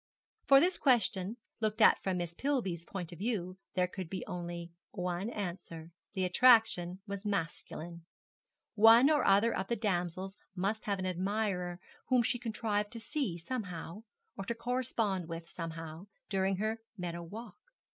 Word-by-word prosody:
For 275 0 +9
this 355 +4 +2
question, 220 -5 +2 0.2
looked 215 -1 -1
at 215 - +6
from 190 -2 -1
Miss 175 -1 -3
Pillby's 195 - -1
point 180 -3 -5
of 175 - -10
view, 190 -4 -2 0.2
there 180 -1 +3
could 180 -1 -6
be 190 - -4
only 175 -1 -5 0.2
one 180 +2 -2
answer. 170 -5 -5 0.2
The 190 -3 -1
attraction 190 -4 +5
was 200 -1 -5
masculine. 170 -3 -3 0.7
One 230 +6 +8
or 300 - +3
other 205 +4 +4
of 190 - -2
the 235 - 0
damsels 190 -2 -2 0.2
must 200 +4 -1
have 200 -1 0
an 190 - -3
admirer 185 -1 -1 0.3
whom 250 -2 +4
she 245 - +1
contrived 215 -3 -1
to 230 - -4
see 260 - -2
somehow, 180 -2 -5 0.3
or 195 - -5
to 235 - -2
correspond 230 -7 -1
with 165 0 -6
somehow, 165 +1 -7 0.2
during 195 0 +1
her 220 +2 -1 0.2
meadow 170 -2 -4
walk. 215 - -9
195 Hz, 155 wpm, -33 LUFS, 175-225 Hz, 0.7 s, For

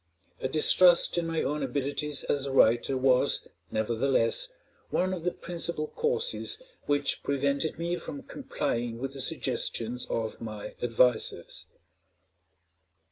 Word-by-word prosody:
A - - 0
distrust 175 +5 +5
in 170 - -2
my 165 -1 -1
own 150 +1 -2
abilities 140 +2 -2
as 140 -1 -1
a - - -3
writer 125 +1 +3
was, 130 -1 +2 0.2
nevertheless, 115 +2 +2 0.4
one 185 +1 0
of 175 -3 -5
the 180 - 0
principal 170 -3 -2
causes 470 +2 0 0.3
which 145 -1 0
prevented 140 +3 -1
me 170 +1 -2
from 270 +7 -8
complying 120 - -3
with 135 +2 -5
the 135 - -4
suggestions 120 0 -1
of 115 0 -3
my 110 -2 -7
advisers. 120 0 +1
140 Hz, 125 wpm, -28 LUFS, 125-170 Hz, 0.4 s, distrust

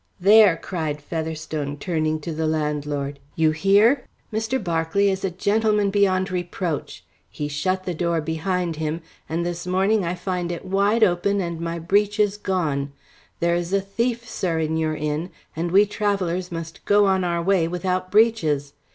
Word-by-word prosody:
"There!" 200 -2 +6
cried 160 -6 -3
Featherstone 155 -2 -4
turning 155 -1 -1
to 165 - -5
the 160 0 -1
landlord. 150 -2 -2 0.2
"You 160 -1 +3
hear? 200 - +4 0.3
Mr. 220 +4 0
Berkeley 175 0 +1
is 190 0 -3
a 195 - +1
gentleman 205 +2 +1
beyond 190 -2 +2
reproach. 175 -2 -3 0.2
He 145 - -4
shut 185 +6 -1
the 180 - -3
door 170 0 0
behind 165 +2 -2
him, 160 +1 -2 0.3
and 165 +2 -1
this 175 0 -4
morning 195 +3 +2
I 170 +1 -2
find 180 -1 -3
it 170 - -6
wide 200 +4 +2
open 200 +1 +2
and 170 -3 -3
my 170 0 -3
breeches 205 +4 +1
gone. 150 -9 -1 0.5
There 170 0 +2
is 175 +1 -2
a 200 - +4
thief, 230 +4 -2
sir, 175 -6 -2
in 160 0 0
your 160 -1 0
inn, 150 +3 -2 0.3
and 170 +2 -2
we 195 +4 +5
travellers 195 -4 -1
must 165 -1 -7
go 205 0 +5
on 190 -1 +2
our 170 -1 -1
way 185 -3 +2
without 185 +1 -2
breeches. 185 -10 +2
175 Hz, 165 wpm, -23 LUFS, 160-195 Hz, 0.5 s, There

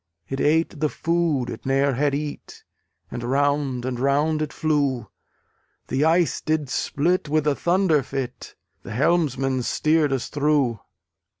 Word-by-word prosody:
It 135 +3 -4
ate 160 +1 +1
the 155 0 +1
food 165 -7 0
it - - -8
ne'er 135 +1 +2
had 140 +2 +1
eat, 150 0 -6 0.5
And 120 - -5
round 140 -1 0
and 125 -2 -3
round 145 +4 +1
it 155 -1 -2
flew. 145 -6 0 0.8
The 140 +3 +1
ice 165 +1 +2
did 155 -3 -1
split 165 +6 0
with 155 0 +1
a 150 - +3
thunder 175 -1 +2
fit; 130 -1 -6 0.3
The - - -8
helmsman 135 -2 +1
steered 155 +3 +1
us 135 -3 -1
through! 145 -6 +1
145 Hz, 140 wpm, -23 LUFS, 135-155 Hz, 0.8 s, a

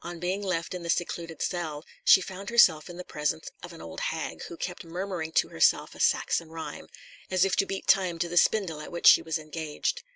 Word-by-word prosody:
On 175 0 -7
being 185 +3 -2
left 180 -4 -2
in 180 - -5
the 170 - -7
secluded 170 -1 -2
cell, 160 -4 -3 0.2
she 190 - +7
found 190 +2 -7
herself 180 -10 +5
in 175 - -9
the 180 - -6
presence 150 -1 -3
of 175 - -9
an 165 - -11
old - - -8
hag, 160 -1 -3
who 170 - -9
kept 180 +1 -5
murmuring 175 -1 -4
to - - +2
herself - - +2
a - - -14
Saxon 165 -2 +1
rhyme, 160 0 -7 0.4
as 185 0 +3
if 195 - +1
to 195 - +2
beat 195 - -4
time 185 -3 +3
to 170 +1 -1
the 175 - -6
spindle 175 -4 +2
at 150 - -9
which 170 - -5
she - - +9
was 160 0 -2
engaged. 155 -1 -3
170 Hz, 225 wpm, -27 LUFS, 160-185 Hz, 0.4 s, she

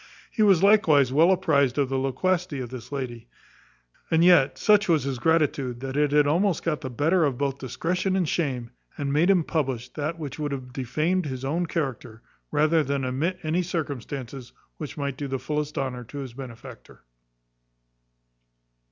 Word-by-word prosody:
He 220 - -2
was 195 -4 +5
likewise 160 - +5
well 160 +5 +5
apprized 150 -9 +2
of 140 -3 +1
the 135 0 0
loquacity 150 +4 -1
of 125 -2 -6
this 125 0 -9
lady; 120 -4 -5 0.8
and 165 +1 +4
yet 175 -7 +5
such 210 -2 +3
was 160 -5 +3
his 135 -2 -3
gratitude, 140 -5 +1
that 135 0 -5
it 145 -1 +2
had 150 0 +4
almost 170 +4 +1
got 160 -2 -1
the 130 - -5
better 155 +5 +2
both 135 +1 -2
of 140 - -26
discretion 180 +8 -1
and 185 -4 +1
shame, 130 -8 -2 0.3
and 140 -1 -2
made 160 +5 +3
him 185 -4 +4
publish 130 -7 -2
that 155 +2 -4
which 150 -3 -7
would 145 -2 -2
have 125 -2 -7
defamed 155 +8 -1
his 130 -1 -5
own 165 +5 -1
character, 125 -8 -4 0.3
rather 155 +1 +3
than 140 -1 -2
omit 150 +9 -1
any 160 +3 +1
circumstances 140 -6 -5 0.3
which 150 -1 -7
might 140 -2 -3
do 145 - -4
the 135 0 -2
fullest 150 +2 -3
honour 125 -2 -3
to 145 - -10
his 135 -4 -6
benefactor. 125 -3 -11
145 Hz, 175 wpm, -25 LUFS, 130-165 Hz, 0.8 s, was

